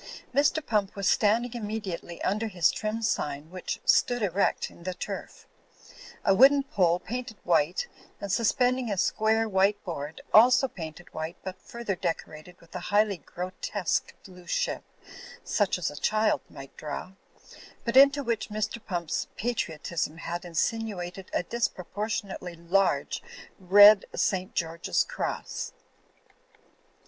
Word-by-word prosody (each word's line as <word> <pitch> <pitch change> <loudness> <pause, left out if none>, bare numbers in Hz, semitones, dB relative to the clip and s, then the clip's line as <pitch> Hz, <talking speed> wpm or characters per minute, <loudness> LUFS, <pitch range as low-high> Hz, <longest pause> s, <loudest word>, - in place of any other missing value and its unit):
Mr. 290 +3 +2
Pump 210 -3 0
was 200 -1 -1
standing 225 +3 +3
immediately 205 -7 -5
under 215 +3 0
his 180 -6 +2
trim 215 +1 -3
sign, 150 -7 -2
which 185 -1 -4
stood 245 -2 +3
erect 195 0 0
in - - -17
the 185 +1 -4
turf; - - -7 0.8
a 195 - +5
wooden 275 +6 +6
pole 180 - +2
painted 235 +2 -6
white 170 - +2 0.3
and 200 - -4
suspending 245 +2 +2
a 200 - -1
square 220 +3 +2
white 195 0 +3
bqard, 155 -3 -5
also 250 +4 +7
painted 170 -5 -9
white 160 +2 -5
but 185 -1 -7
further 235 -5 -4
decorated 175 0 -5
with 170 - -20
a - - -2
highly 205 -1 +3
grotesque 185 +4 -3
blue 180 -2 -14
ship, - - -1 0.6
such 205 -4 +1
as 180 - -2
a - - -10
child 215 +7 +1
might 135 -2 -11
draw, 155 +4 -6 0.7
b^t 235 +1 -1
into 280 +1 +7
which 230 -3 -2
Mr. 215 +2 -3
Pump's 170 -3 -2
patri 220 -8 -2
otism 160 0 -3
had 175 +1 -4
insinuated 180 0 -2
a - - 0
disproportionately 200 -3 -3
large 175 +4 +1 0.4
red 205 +2 +8
St. 185 -1 -1
George's 165 +2 0
cross. - - -4
195 Hz, 135 wpm, -28 LUFS, 175-225 Hz, 0.8 s, red